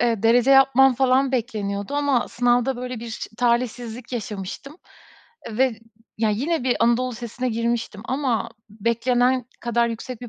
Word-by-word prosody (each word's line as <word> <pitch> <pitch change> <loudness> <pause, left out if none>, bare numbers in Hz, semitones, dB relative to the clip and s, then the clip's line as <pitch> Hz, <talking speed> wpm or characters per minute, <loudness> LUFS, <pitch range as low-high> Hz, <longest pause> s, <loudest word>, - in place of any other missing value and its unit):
eee, 230 -3 +1
derece 240 +3 +4
yapmam 270 -1 +6
falan 265 +1 +2
bekleniyordu 210 -2 -2
ama 285 -4 +1
sınavda 245 +1 +1
böyle 250 -1 -5
bir 230 -1 -7 0.2
talihsizlik 240 0 -1
yaşamıştım 220 - -6 0.7
ve 235 0 +1 0.4
ya, 220 -1 +2
yine 275 +6 -1
bir 250 - +2
anadolu 240 +2 +2
lisesine 240 +2 -4
girmiştim 230 -2 -2
ama 260 -3 -1 0.2
beklenen 245 +3 +1 0.2
kadar 235 0 +1
yüksek 230 +1 -6
bir 245 - -8
240 Hz, 135 wpm, -23 LUFS, 230-255 Hz, 0.7 s, yapmam